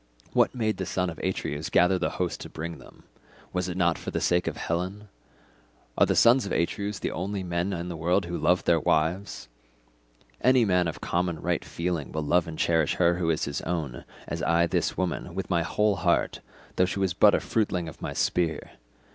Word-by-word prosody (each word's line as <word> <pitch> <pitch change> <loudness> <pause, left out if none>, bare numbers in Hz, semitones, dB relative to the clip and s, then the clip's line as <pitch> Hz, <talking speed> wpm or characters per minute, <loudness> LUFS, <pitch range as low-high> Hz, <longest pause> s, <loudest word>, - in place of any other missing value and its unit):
What - - +3
made 110 -3 0
the 95 - -3
son 90 -1 -1
of 80 - -11
Atreus 80 -5 -3
gather 90 +1 +4
the - - 0
host 90 -2 -2
and - - -10
bring 85 +1 -6
them? - - -16 0.5
Was 90 0 -1
it 90 - -4
not 85 -3 +2
for - - -6
the - - -2
sake 90 0 +1
of - - -2
Helen? 95 +5 -3 0.9
Are - - +4
the - - +1
sons 120 +2 +6
of - - -6
Atreus 100 +4 -1
the - - -3
only 95 +3 -3
men 85 +2 -1
in 85 -2 -3
the 85 - -5
world 85 +3 +1
who 85 0 -4
love 90 +3 +2
their 85 -1 +3
wives? 80 +2 0 0.9
Any 130 -1 +5
man 90 -3 +2
of 75 -6 -5
common 85 -2 -1
right - - -1
feeling 85 -4 -3
will 80 0 -2
love 85 +3 +2
and 80 -1 -6
cherish 80 -3 +2
her 85 -1 +3
who 85 -2 0
is 80 - +1
his 70 -1 -3
own, 80 -8 -3 0.2
as - - -4
I 85 +1 +3
this 85 -2 -1
woman, 90 -1 -2
with 95 -1 -4
my 85 -1 +3
whole 105 +4 +1
heart, 85 0 +1 0.4
though 90 - +5
she 90 - -3
was 95 -2 +1
but 100 +3 +6
a - - +2
fruitling 95 -6 -1
of 80 - -10
my - - -4
spear. 80 -4 -1
90 Hz, 210 wpm, -27 LUFS, 85-95 Hz, 0.9 s, sons